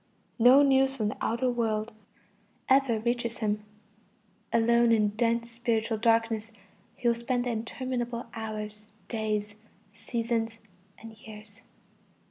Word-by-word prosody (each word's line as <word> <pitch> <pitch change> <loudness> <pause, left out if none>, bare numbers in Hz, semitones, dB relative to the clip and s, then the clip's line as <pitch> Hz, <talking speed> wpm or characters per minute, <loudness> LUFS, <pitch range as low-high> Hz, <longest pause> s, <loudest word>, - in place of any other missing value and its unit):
No 255 +5 +7
news 270 -1 +3
from 215 -5 -1
the - - -6
outer 235 +3 0
world 225 -2 -1 0.7
ever 265 -3 +4
reaches 235 +1 -1
him. 210 -2 -1 0.9
Alone 235 +1 +4
in 215 -2 +4
dense 230 +2 0
spiritual 230 -2 -1
darkness, 225 -1 +1 0.4
he 245 - -2
will 235 - +5
spend 245 +1 -2
the 245 - 0
interminable 240 +1 -3
hours, 215 -1 -6 0.2
days, 215 -2 -2 0.4
seasons, 225 0 -2 0.4
and 225 0 -11
years. 215 0 -12
230 Hz, 115 wpm, -28 LUFS, 220-240 Hz, 0.9 s, No